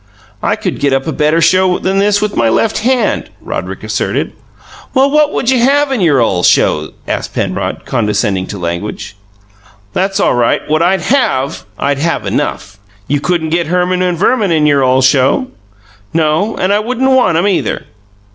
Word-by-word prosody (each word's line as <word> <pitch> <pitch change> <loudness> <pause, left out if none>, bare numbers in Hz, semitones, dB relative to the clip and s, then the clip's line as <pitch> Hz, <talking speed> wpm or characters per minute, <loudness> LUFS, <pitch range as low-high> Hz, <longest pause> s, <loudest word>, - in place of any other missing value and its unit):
"I - - +1
could - - -4
get 140 -1 +1
up 135 0 0
a 160 - -2
better 155 +2 +1
show 185 +2 +3
than 190 +1 -1
this 205 +1 +2
with 210 - -2
my 115 - +2
left 220 - +1
hand," 250 +3 0
Roderick - - -6
asserted. - - -2 0.6
"Well, 270 +2 +3
what 300 0 +3
would 255 - 0
you 255 - +2
have 280 +3 +2
in 255 -6 -1
your 150 -6 +3
ole 95 -7 +1
show?" - - +2
asked - - -4
Penrod, - - -3
condescending 105 -4 -1
to 100 - -6
language. 90 +3 -5 0.8
"That's 195 +1 -1
all - - +2
right, 120 -1 0
what 155 +1 +1
I'd 180 +2 +2
HAVE. 160 - 0
I'd 140 -1 -1
have 165 +3 -1
enough!" 100 0 -3 0.3
"You 145 +1 0
couldn't 165 0 -1
get 170 +1 0
Herman 180 +1 0
and 180 -2 0
Verman 205 +1 +1
in 155 -2 +2
your 145 -2 +3
ole 130 0 +3
show." 135 - +2 0.7
"No, 160 +6 +1
and 185 +2 +1
I 205 - +2
wouldn't 255 +4 0
want 250 -11 +3
'em, 185 +5 +2
either!" 195 - -1
175 Hz, 180 wpm, -13 LUFS, 140-210 Hz, 0.8 s, show